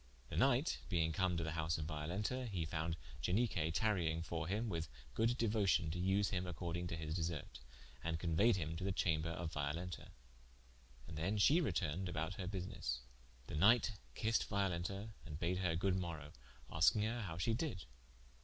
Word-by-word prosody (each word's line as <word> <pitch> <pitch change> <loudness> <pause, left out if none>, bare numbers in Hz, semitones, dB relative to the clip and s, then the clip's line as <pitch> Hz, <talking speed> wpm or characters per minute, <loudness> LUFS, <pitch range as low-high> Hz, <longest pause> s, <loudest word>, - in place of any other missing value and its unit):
The - - -5
knight 135 +2 +3
being 80 -4 +2
come 90 +2 +1
to 85 - 0
the 80 - -2
house 80 0 0
of 75 - -3
Violenta, 90 +11 -2
he 90 -6 -1
found 80 +1 -2 0.2
Ianique 90 - +1
tarying 85 -7 +2
for 85 -1 -3
him, 105 +5 0
with 85 -6 -2 0.3
good 115 - +2
deuocion 105 -8 +2
to 90 - -3
vse 95 +2 +3
him 90 -2 -1
according 85 0 -3
to 85 - -3
his 80 -1 -3
desert, 80 -5 -3 0.4
and 85 0 0
conueyed 90 +7 +4
him 80 -3 -2
to 95 - -4
the 100 - +1
chamber 85 -3 +1
of 85 0 -4
Violenta, 80 +5 -3 1.0
and 75 -2 -6
then 95 +6 0
she 150 - +6
retourned 90 - 0
about 80 +2 -2
her 95 -1 -5
busines. 90 -10 -3 0.4
The - - -8
knighte 110 +8 +5 0.2
kissed 115 +1 +1
Violenta 100 +1 -1
and 75 -3 -6
bad 90 +2 0
her 90 -3 +1
good 95 +3 +2
morowe, 85 -5 -3 0.4
asking 85 +6 +5
her 115 +2 -1
how 85 -6 -4
she 110 +6 +1
did? 115 - -2
90 Hz, 175 wpm, -38 LUFS, 80-100 Hz, 1.0 s, she